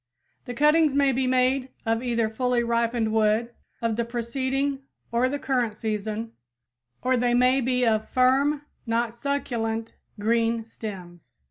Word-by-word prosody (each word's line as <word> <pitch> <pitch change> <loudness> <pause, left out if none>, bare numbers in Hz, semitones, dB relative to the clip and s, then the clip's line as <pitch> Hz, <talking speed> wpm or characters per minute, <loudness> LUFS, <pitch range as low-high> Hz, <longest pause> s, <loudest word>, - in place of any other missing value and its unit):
The 245 - -6
cuttings 300 +1 +4
may 280 -1 +4
be 260 0 0
made 255 +1 +2 0.2
of 225 0 +1
either 235 -3 0
fully 245 +2 0
ripened 235 -1 0
wood 220 +2 +2 0.3
of 225 -1 0
the 235 - +1
preceding 260 +4 -2 0.3
or 240 +2 +2
the 285 - -2
current 250 -6 -1
season, 215 +1 -3 0.7
or 255 0 +2
they 240 0 +2
may 255 +2 +4
be 250 0 +1
of 220 -1 +1
firm, 275 +3 +3 0.2
not 230 0 0
succulent 235 -4 -2 0.3
green 230 +1 +1
stems. 175 - -9
235 Hz, 140 wpm, -25 LUFS, 225-260 Hz, 0.7 s, cuttings